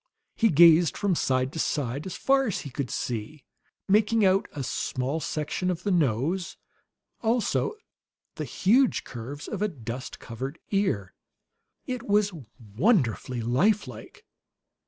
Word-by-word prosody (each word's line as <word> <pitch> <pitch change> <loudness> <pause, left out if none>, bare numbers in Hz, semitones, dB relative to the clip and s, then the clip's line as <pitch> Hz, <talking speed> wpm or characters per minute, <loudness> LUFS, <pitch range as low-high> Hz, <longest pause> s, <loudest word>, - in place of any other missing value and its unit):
He 225 - +3
gazed 170 0 +6
from 200 -2 +1
side 130 -4 0
to 160 - -5
side 140 +1 -1
as 185 - -5
far 270 -1 +2
as 205 - -2
he 140 - -8
could 130 -1 -3
see, 125 +5 -4 0.4
making 210 +2 +3
out 190 +1 +3
a 140 - -5
small 130 +4 -2
section 155 +4 -2
of 180 0 -3
the 205 - 0
nose, 165 - 0 0.6
also 235 - 0 0.6
the - - -5
huge 245 +7 +2
curves 130 +4 -8
of 205 - -5
a 210 - +2
dust 125 - -7
covered 130 +6 -6
ear. 165 - 0 0.7
It 250 -2 -3
was 205 -1 +3 0.4
wonderfully 130 - +1
life 150 - +2
like. 115 -3 -11
160 Hz, 135 wpm, -27 LUFS, 130-205 Hz, 0.7 s, gazed